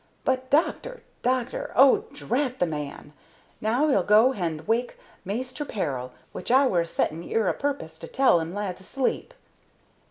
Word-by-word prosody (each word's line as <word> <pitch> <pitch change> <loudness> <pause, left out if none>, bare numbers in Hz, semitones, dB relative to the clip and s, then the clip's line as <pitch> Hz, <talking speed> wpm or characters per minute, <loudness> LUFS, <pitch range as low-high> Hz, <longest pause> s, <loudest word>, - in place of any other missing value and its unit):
But, 260 0 0
doctor! 465 - 0 0.2
doctor! 255 0 -1
Oh, 270 +1 +6
drat 265 -1 -1
the 180 - +2
man! 150 -2 -6 0.5
now 240 +8 +2
'e'll 265 -10 +3
go 215 +7 +5
hand 165 -9 -4
wake 240 - 0 0.3
Maister 255 +8 -4
Peril, 135 - -3 0.2
which - - -7
I 265 +3 +5
were 180 -9 +2
a 170 - -3
settin' 165 0 -1
'ere 220 +2 0
a - - +2
pu'pos' 280 - -4
to 165 - -8
tell 260 -7 +4
'im 165 +1 -4
lad's 190 -2 -4
asleep." 260 +7 -2
225 Hz, 160 wpm, -26 LUFS, 170-265 Hz, 0.5 s, Oh